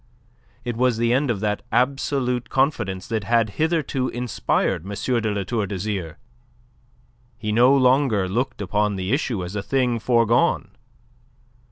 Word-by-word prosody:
It 120 -1 -2
was 125 -1 +2
the 115 +1 +2
end 135 +2 +1
of 105 -5 -1
that 105 -1 -1
absolute 125 0 0
confidence 110 -9 0
that 110 -2 -1
had 115 -1 +2
hitherto 155 -5 0
inspired 120 -8 -1
M. 95 - -9
de 115 0 0
La 100 -1 -2
Tour 105 0 -2
d'Azyr. 95 -4 -4 1.2
He 110 -2 -3
no 125 +5 +5
longer 130 -6 +3
looked 115 +2 -2
upon 105 +2 0
the 95 +4 -2
issue 120 - -1
as 90 +4 -7
a 105 - -1
thing 125 +1 0
forgone. 115 0 +2
115 Hz, 145 wpm, -23 LUFS, 105-125 Hz, 1.2 s, no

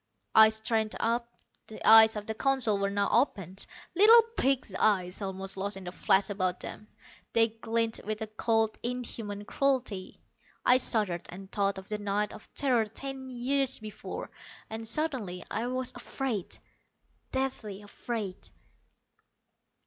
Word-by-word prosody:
I 220 0 +9
straightened 220 0 0
up. 235 +1 0 0.4
The 220 - -6
eyes 220 0 +9
of 210 0 -5
the 220 - -3
Council 240 -4 +2
were 200 0 0
now 200 0 0
opened, 195 - 0 0.3
little 435 +6 +9 0.2
pig's 265 -7 +1
eyes 185 -1 +1
almost 195 0 -5
lost 200 +1 -2
in 195 - -8
the 180 - -6
flesh 195 +2 +2
about 185 -2 -1
them. 210 - -7 0.5
They 225 0 +4
glinted 225 0 -2
with 215 0 -2
a - - -2
cold, 220 0 0
inhuman 230 -4 -5
cruelty. 255 -8 -1 0.5
I 250 +1 +6
shuddered, 205 -9 0
and 190 +2 -10
thought 200 -1 0
of 190 0 -9
the 210 -1 -4
night 205 0 -1
of 215 - -13
terror 250 -5 +2
ten 265 +4 -7
years 265 +2 0
before. 215 -2 -7 0.4
And 225 0 -5
suddenly 230 - -1
I 230 +2 -1
was 255 0 -2
afraid, 245 -5 -4 0.7
deathly 225 -7 -3
afraid. 205 -2 -6
220 Hz, 140 wpm, -29 LUFS, 200-245 Hz, 0.7 s, I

